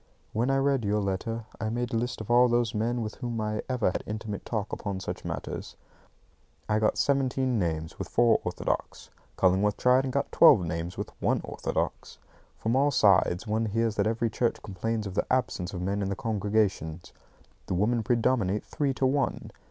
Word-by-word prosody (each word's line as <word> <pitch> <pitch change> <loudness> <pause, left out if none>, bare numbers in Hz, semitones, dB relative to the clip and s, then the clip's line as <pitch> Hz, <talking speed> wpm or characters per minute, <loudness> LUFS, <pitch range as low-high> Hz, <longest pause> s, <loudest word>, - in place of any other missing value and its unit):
When 120 +4 +1
I 135 - +3
read 135 -2 +2
your 105 +1 +1
letter, 105 +3 -2
I 110 - -1
made 120 +1 -2
a - - +1
list 115 0 -2
of 110 - -5
all 125 +1 +6
those 120 -2 +1
men 115 +2 -1
with 105 - -6
whom 120 -3 -3
I 105 0 -1
ever 125 -7 +1
had - - -4
intimate 105 -1 -5
talk 105 -3 -3
upon 100 -2 -3
such - - -5
matters. - - -5 0.9
I 105 0 +2
got 110 - +1
seventeen 130 -3 +1
names, 80 -3 -2
with - - -5
four 120 -1 +4
orthodox. - - -3 0.3
Cullingworth 95 +3 +3
tried 125 +1 +4
and 130 - -2
got 140 +2 -1
twelve 160 - +7
names, 85 +1 -4
with - - -4
one - - +2
orthodox. - - -3 0.4
From 115 +2 0
all 140 +2 +4
sides, 100 -6 +3
one 110 +1 0
hears 115 +1 0
that 100 0 +2
every 115 0 0
church 120 +1 -1
complains 110 +2 -3
of 100 - -5
the - - -1
absence 105 -8 0
of 90 -2 -5
men 100 +2 -1
in 95 - -1
the 100 - -1
congregations. 105 -7 -1 0.5
The - - -1
women 115 +6 +2
predominate 115 -4 +1
three 140 -4 -1
to 135 - +1
one. 135 +1 0
110 Hz, 190 wpm, -28 LUFS, 100-120 Hz, 0.9 s, twelve